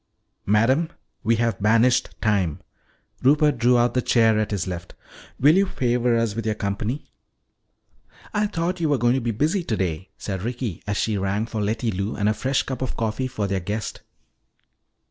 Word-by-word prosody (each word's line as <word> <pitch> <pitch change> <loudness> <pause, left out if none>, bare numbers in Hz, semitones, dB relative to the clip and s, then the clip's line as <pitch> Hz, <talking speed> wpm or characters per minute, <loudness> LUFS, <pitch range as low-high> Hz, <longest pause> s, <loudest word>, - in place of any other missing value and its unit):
"Madam, 130 - +3 0.3
we 115 +2 +3
have 115 -2 -1
banished 115 +4 +3
time." 100 -8 +1 0.6
Rupert 145 +2 +3
drew 125 0 +4
out 120 0 +2
the 125 - +1
chair 115 -3 +3
at 110 - 0
his 100 -4 -2
left. 85 -2 -6 0.4
"Will 145 +4 +6
you 195 +1 +3
favor 120 -5 +1
us 115 -2 0
with 115 +2 -3
your 110 0 -1
company?" 105 +7 -3 1.2
"I 210 0 +1
thought 180 -1 -2
you 160 -2 +1
were 145 - +3
going 120 0 +3
to 130 - 0
be 120 - -2
busy 155 - 0
today," 95 - -2
said 95 -3 -4
Ricky 120 -3 -4
as 100 -1 -1
she 110 -3 0
rang 100 +3 0
for 110 -2 -4
Letty 110 +3 -1
Lou 100 +3 -3
and 105 -1 0
a 105 - +3
fresh 135 +5 0
cup 130 -2 -5
of 130 - -3
coffee 115 +3 -1
for 110 -5 -3
their 100 -1 -1
guest. 105 +4 -4
115 Hz, 185 wpm, -23 LUFS, 105-130 Hz, 1.2 s, Will